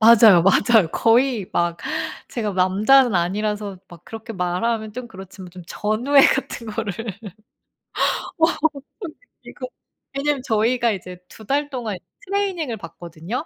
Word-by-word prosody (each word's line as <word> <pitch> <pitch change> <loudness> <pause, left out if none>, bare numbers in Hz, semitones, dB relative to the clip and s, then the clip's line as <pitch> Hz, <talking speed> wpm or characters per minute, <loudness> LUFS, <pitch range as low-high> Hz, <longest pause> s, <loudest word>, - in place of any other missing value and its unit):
맞아요, 220 -5 +7
맞아요. 200 0 +4
거의 230 -3 +2
막 170 0 0 0.5
제가 215 -5 -3
남자는 205 +6 +4
아니라서 200 +2 -1
막 175 -1 -15
그렇게 225 0 -8
말하면 210 +4 -2
좀 250 +1 -7
그렇지만 190 -2 -11
좀 180 0 -11
전우애 235 +10 +2
같은 260 -3 -2
거를. 210 -2 -3 1.5
와 325 +1 +5
막 - - -3 0.4
엄청 360 -7 -6 0.3
느끼고 - - -8 0.5
왜냐면 285 -1 0
저희가 235 +1 +1
이제 185 -3 -7
2 220 - -14
달 285 +3 0
동안 235 -8 -4 0.3
트레이닝을 370 - -2
받거든요. 170 - -7
220 Hz, 290 characters per minute, -21 LUFS, 185-250 Hz, 1.5 s, 맞아요